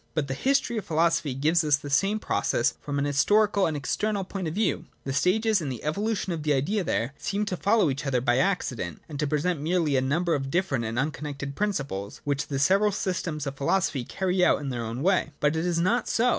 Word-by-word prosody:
But 155 Hz, -3 st, 0 dB
the 135 Hz, -, -2 dB
History 260 Hz, -, +1 dB
of 200 Hz, -, -9 dB
Philo 165 Hz, 0 st, +3 dB
sophy 145 Hz, -5 st, -2 dB
gives 160 Hz, +5 st, +2 dB
us 150 Hz, -2 st, +3 dB
the 145 Hz, 0 st, -8 dB
same 195 Hz, +9 st, +2 dB
process 120 Hz, -, 0 dB
from 145 Hz, -1 st, -3 dB
an 140 Hz, -, +1 dB
historical 200 Hz, +8 st, +3 dB
and, 155 Hz, -2 st, -2 dB
external 200 Hz, +8 st, -1 dB
point 190 Hz, -1 st, -4 dB
of 160 Hz, -, -4 dB
view. 210 Hz, -2 st, 0 dB, 0.2 s
The 135 Hz, -, -3 dB
stages 210 Hz, +6 st, +2 dB
in 150 Hz, -, -3 dB
the 125 Hz, -4 st, -6 dB
evolution 200 Hz, +4 st, -1 dB
of 160 Hz, -, -4 dB
the 150 Hz, 0 st, +1 dB
Idea 185 Hz, +10 st, 0 dB
there 125 Hz, -5 st, -1 dB
seem 205 Hz, +1 st, -1 dB
to 195 Hz, -, -2 dB
follow 200 Hz, +5 st, +3 dB
each 140 Hz, +2 st, -4 dB
other 130 Hz, -2 st, +2 dB
by 120 Hz, +1 st, +2 dB
accident, 130 Hz, -, -1 dB
and 145 Hz, -3 st, -7 dB
to 150 Hz, -, +1 dB
present 155 Hz, +2 st, 0 dB
merely 160 Hz, -2 st, +1 dB
a 130 Hz, -, +3 dB
number 165 Hz, +6 st, +1 dB
of 135 Hz, -1 st, -1 dB
different 140 Hz, -7 st, 0 dB
and 110 Hz, +1 st, -3 dB
un 145 Hz, +4 st, +1 dB
connected 140 Hz, -2 st, -6 dB
principles, 140 Hz, -, -3 dB
which 145 Hz, 0 st, -1 dB
the 140 Hz, -, -2 dB
several 195 Hz, +9 st, +3 dB
systems 170 Hz, -6 st, -2 dB
ot 140 Hz, -1 st, -5 dB
philosophy 140 Hz, -2 st, 0 dB
carry 185 Hz, +6 st, 0 dB
out -, -, +4 dB
in 140 Hz, -1 st, -4 dB
their 120 Hz, -2 st, -3 dB
own 115 Hz, +4 st, -4 dB
way. 185 Hz, -4 st, +2 dB
But 150 Hz, +1 st, +2 dB
it 160 Hz, +2 st, -1 dB
is 175 Hz, -1 st, 0 dB
not 185 Hz, +9 st, +1 dB
so. 245 Hz, +2 st, +2 dB
155 Hz, 235 wpm, -26 LUFS, 140-190 Hz, 0.2 s, out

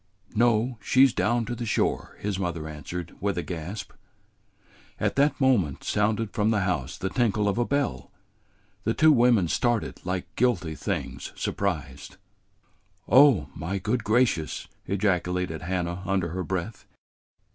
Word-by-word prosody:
"No; 115 Hz, +1 st, +2 dB
she 130 Hz, +6 st, +5 dB
's 135 Hz, -, +1 dB
down 120 Hz, +1 st, +1 dB
to 120 Hz, -, -4 dB
the 120 Hz, 0 st, -4 dB
shore," -, -, -1 dB
his 100 Hz, -2 st, -2 dB
mother 85 Hz, -4 st, -3 dB
answered, 80 Hz, +4 st, -7 dB
with 100 Hz, -2 st, -1 dB
a 85 Hz, -, -1 dB
gasp. 90 Hz, +4 st, -6 dB, 1.1 s
At -, -, 0 dB
that 145 Hz, +2 st, +2 dB
moment 110 Hz, -, +2 dB
sounded 105 Hz, +1 st, 0 dB
from 105 Hz, -1 st, +1 dB
the 110 Hz, -2 st, +2 dB
house 80 Hz, -8 st, -2 dB
the 95 Hz, -, -3 dB
tinkle 105 Hz, -3 st, +1 dB
of 100 Hz, +2 st, 0 dB
a 120 Hz, -, +2 dB
bell. 140 Hz, -, -1 dB, 0.7 s
The 115 Hz, -, 0 dB
two 155 Hz, 0 st, +6 dB
women 120 Hz, -, +4 dB
started 120 Hz, +5 st, -1 dB
like 90 Hz, -1 st, -4 dB
guilty 105 Hz, -10 st, +1 dB
things -, -, -4 dB
surprised. 70 Hz, -8 st, -3 dB, 0.9 s
"Oh, 135 Hz, -3 st, +6 dB
my 95 Hz, +5 st, -3 dB
good 110 Hz, +5 st, -1 dB
gracious!" 110 Hz, -8 st, +1 dB, 0.2 s
ejaculated 90 Hz, -4 st, 0 dB
Hannah 90 Hz, -1 st, -2 dB
under 95 Hz, -3 st, 0 dB
her 90 Hz, +3 st, -3 dB
breath. 95 Hz, +4 st, -4 dB
100 Hz, 145 wpm, -26 LUFS, 90-115 Hz, 1.1 s, two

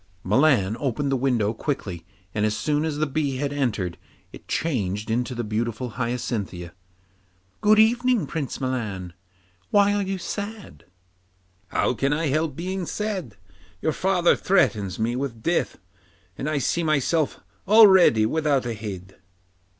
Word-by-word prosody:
Milan 110 Hz, -2 st, +3 dB
opened 140 Hz, +1 st, -1 dB
the -, -, +2 dB
window 120 Hz, -5 st, +1 dB
quickly, 95 Hz, -, -4 dB, 0.3 s
and 105 Hz, -, -1 dB
as 105 Hz, 0 st, +1 dB
soon 150 Hz, +7 st, 0 dB
as 155 Hz, -2 st, -2 dB
the 155 Hz, -, +1 dB
bee 145 Hz, -1 st, -1 dB
had 140 Hz, +1 st, -2 dB
entered, 105 Hz, -11 st, -2 dB, 0.3 s
it -, -, -13 dB
changed 110 Hz, -, -2 dB
into 125 Hz, +2 st, -1 dB
the 120 Hz, -, -2 dB
beautiful 115 Hz, +3 st, -2 dB
Hyacinthia. 110 Hz, -8 st, -3 dB, 0.9 s
'Good 215 Hz, +1 st, +5 dB
evening, 240 Hz, +1 st, +3 dB
Prince 150 Hz, -5 st, -4 dB
Milan. 110 Hz, -9 st, -3 dB, 0.6 s
Why 205 Hz, 0 st, +4 dB
are 205 Hz, -, +1 dB
you 195 Hz, 0 st, -2 dB
so 195 Hz, +3 st, -4 dB
sad?' 215 Hz, -3 st, -15 dB, 0.8 s
'How 95 Hz, -, 0 dB
can 135 Hz, +4 st, 0 dB
I 155 Hz, 0 st, 0 dB
help 155 Hz, 0 st, 0 dB
being 180 Hz, +2 st, -4 dB
sad? 190 Hz, -, -4 dB, 0.4 s
Your 155 Hz, -, 0 dB
father 180 Hz, -1 st, +3 dB
threatens 105 Hz, -, +1 dB
me 115 Hz, +2 st, -1 dB
with 125 Hz, -4 st, -4 dB
death, 170 Hz, 0 st, 0 dB, 0.6 s
and 145 Hz, -, -3 dB
I 155 Hz, -, 0 dB
see 155 Hz, +5 st, 0 dB
myself 155 Hz, 0 st, +1 dB, 0.3 s
already 190 Hz, -, +7 dB
without 145 Hz, 0 st, +1 dB
a 120 Hz, -, -2 dB
head. 95 Hz, -4 st, -8 dB
135 Hz, 145 wpm, -24 LUFS, 110-165 Hz, 0.9 s, already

